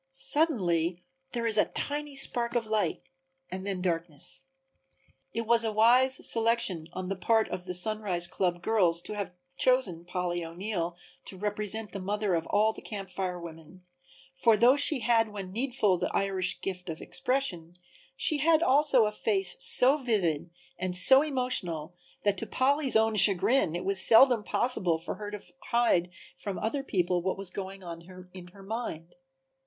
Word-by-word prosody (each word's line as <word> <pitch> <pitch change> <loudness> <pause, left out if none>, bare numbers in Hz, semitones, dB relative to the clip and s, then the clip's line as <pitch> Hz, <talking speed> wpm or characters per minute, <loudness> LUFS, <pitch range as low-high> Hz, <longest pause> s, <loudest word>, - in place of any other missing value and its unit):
Suddenly 180 - 0 0.3
there 235 -2 -3
is 220 -2 +3
a - - +4
tiny 290 0 -4
spark 240 -3 -1
of 235 -2 0
light 215 -1 -1 0.5
and 190 +1 -6
then 190 -2 -3
darkness. 170 - -4 0.9
It 230 - -4
was 230 +1 +4
a 220 - -1
wise 250 +5 +3
selection 225 -8 +2
on 185 0 -5
the 195 - -3
part 220 +4 +1
of 180 - -6
the 180 -1 -2
Sunrise 190 -2 +1
club 175 0 -2
girls 175 -6 +1
to - - -6
have 200 -3 -4 0.3
chosen 235 -10 +1
Polly 175 -1 -3
O'Neill 175 0 -4 0.3
to 190 - -4
represent 210 +2 -2
the 200 - -6
mother 205 +1 -2
of 165 -1 -1
all 215 +2 +2
the - - -11
Camp 195 -3 -8
Fire 180 -2 -4
women, 170 +2 -12 0.5
for 235 -5 +3
though 240 +5 +5
she 285 -2 +3
had 225 -1 +2
when 195 -3 -8
needful 220 -5 0
the - - -2
Irish 190 -2 -1
gift 180 -2 -6
of 160 - -6
expression, 180 -7 -2 0.4
she 300 +2 +1
had 320 +2 +3
also 275 -5 +4
a 210 - -1
face 195 -3 +1
so 265 +4 +3
vivid 180 - -1 0.3
and 180 0 -1
so 265 +8 +8
emotional 250 - -2 0.3
that 205 -2 0
to - - -5
Polly's 275 0 +1
own 220 0 +3
chagrin 195 0 +5
it 175 - -5
was 195 -1 +2
seldom 235 -1 +6
possible 195 -9 0
for 165 - -6
her 210 -1 -7
to 210 -1 -8 0.3
hide 230 -7 +2 0.3
from 200 -2 -5
other 230 +6 -2
people 180 -8 -1
what 190 +2 -2
was 195 -2 -3
going 195 0 -7
on 170 -1 -8 0.3
in 180 -1 -11
her 195 +2 -16
mind. 195 -6 -6
200 Hz, 170 wpm, -28 LUFS, 180-235 Hz, 0.9 s, so